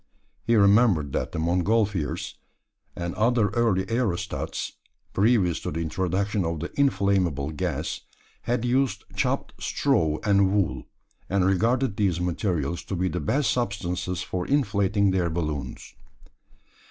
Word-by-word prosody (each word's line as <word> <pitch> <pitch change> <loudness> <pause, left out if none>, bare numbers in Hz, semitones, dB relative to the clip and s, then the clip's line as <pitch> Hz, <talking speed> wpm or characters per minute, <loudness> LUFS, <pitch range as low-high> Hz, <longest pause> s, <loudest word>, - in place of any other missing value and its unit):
He 115 +2 +2
remembered 100 - +4
that - - -2
the - - -5
Montgolfiers, 90 +1 0 0.6
and 85 0 -4
other 115 -1 +2
early 110 -6 +1
aerostats 115 -5 -2 0.4
previous 100 -5 +3
to - - -4
the 80 - -3
introduction 95 +5 -1
of 80 -1 -2
the 85 - -5
inflammable 95 - +1
gas 75 - -3 0.4
had 120 0 -1
used 130 +2 +1
chopped - - -1
straw 80 -1 +1
and 100 -1 +3
wool, 100 -3 0 0.4
and 95 -1 +2
regarded 115 +4 +1
these 95 -5 +1
materials 90 -2 -1
to 95 - -3
be 90 +1 0
the - - -3
best 135 - +1
substances 90 -6 -2
for 90 -1 -4
inflating 100 -7 +2
their 90 -2 +1
balloons. 75 -4 -4
95 Hz, 130 wpm, -25 LUFS, 85-110 Hz, 0.6 s, remembered